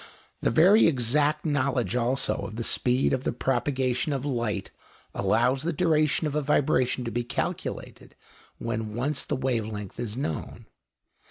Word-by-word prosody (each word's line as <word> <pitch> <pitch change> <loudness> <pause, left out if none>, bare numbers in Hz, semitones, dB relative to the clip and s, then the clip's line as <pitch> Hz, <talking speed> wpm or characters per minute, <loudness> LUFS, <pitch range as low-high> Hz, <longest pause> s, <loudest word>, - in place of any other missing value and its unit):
The - - +2
very 185 - +6
exact 150 +3 +1
knowledge 135 -5 0
also 125 +2 +1
of 110 - -6
the 115 - -3
speed 125 +3 +2
of 130 -1 -1
the - - 0
propagation 130 +2 0
of 135 0 -3
light 115 -7 -2 0.4
allows 125 +3 +2
the 170 +3 -1
duration 155 -2 +2
of 150 - -2
a 150 - +1
vibration 130 -3 +1
to 115 - -3
be 120 +2 -1
calculated 120 - -5 0.4
when 110 -2 -4
once 135 +4 -1
the 145 - -2
wave 125 -5 -1
length 105 -2 -7
is 120 -1 -4
known. 80 - -4
130 Hz, 155 wpm, -26 LUFS, 120-145 Hz, 0.4 s, very